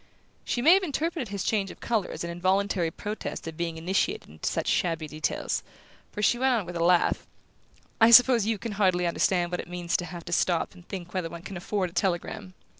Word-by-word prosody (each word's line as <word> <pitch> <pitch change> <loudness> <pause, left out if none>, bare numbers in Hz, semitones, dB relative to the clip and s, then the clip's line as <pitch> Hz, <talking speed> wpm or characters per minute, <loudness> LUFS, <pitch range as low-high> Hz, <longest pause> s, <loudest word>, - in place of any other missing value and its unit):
She 240 - -2
may 325 +5 +8
have 385 - +5
interpreted 320 -4 -2
his 200 -1 -4
change 200 -3 0
of - - -11
colour 225 -5 -1
as - - -5
an 170 - -4
involuntary 185 0 +1
protest 210 +1 -6
at 165 - -6
being 165 0 -3
initiated 190 - -1
into - - -3
such - - -2
shabby 165 -3 0
details, 155 +1 -2 0.5
for 210 - -4
she 240 - +3
went 260 -1 +3
on 215 -5 -1
with 175 0 -7
a 170 - 0
laugh: 175 0 +2 0.7
"I 225 - +8
suppose 235 -2 +7
you 225 -1 +1
can 230 +1 -5
hardly 185 -3 +2
understand 175 +1 +1
what 180 - -2
it - - -7
means 175 -1 -2
to 175 - -4
have 175 -1 -8
to 175 - -4
stop 175 -1 +1
and 175 -2 -17
think 180 -3 -7
whether 180 -3 -2
one 170 +1 -9
can 195 - -7
afford 185 0 -2
a - - -23
telegram? 185 +1 -2
185 Hz, 220 wpm, -27 LUFS, 175-215 Hz, 0.7 s, may